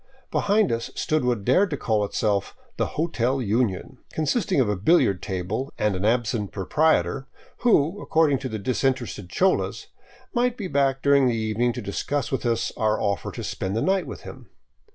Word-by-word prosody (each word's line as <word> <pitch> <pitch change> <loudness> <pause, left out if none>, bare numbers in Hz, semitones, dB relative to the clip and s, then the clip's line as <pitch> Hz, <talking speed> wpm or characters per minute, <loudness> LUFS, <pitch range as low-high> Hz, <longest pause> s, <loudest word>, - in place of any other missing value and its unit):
Behind 205 0 +2
us 115 0 -2
stood 155 -2 0
what 120 -5 0
dared 185 +11 +4
to 145 - -3
call 110 -4 0
itself 100 -1 -1 0.2
the - - +1
" - - -14
Hotel 135 -5 0
Union," 110 -4 -1
consisting 185 - 0
of 125 - +3
a 105 - 0
billiard 100 - +3
table 100 +8 -3
and 105 -2 +1
an 95 +2 -2
absent 115 -2 0
proprietor, 135 - +1 0.3
who, 205 -5 +2
according 155 -4 +2
to 130 -1 -4
the 110 - -3
disinterested 120 -3 -1
cholas, 185 - 0 0.4
might 245 -1 +1
be 210 - -4
back 135 -4 +1
during 140 -2 +5
the 120 - +1
evening 110 +2 0
to - - -6
dis 100 - -3
cuss 145 -1 -2
with 130 -2 -1
us 115 -1 0
our 110 0 +1
offer 100 -3 -1
to - - -7
spend 95 +1 -3
the 115 - 0
night 190 0 +1
with - - -7
him. - - -11
125 Hz, 185 wpm, -24 LUFS, 105-155 Hz, 0.4 s, during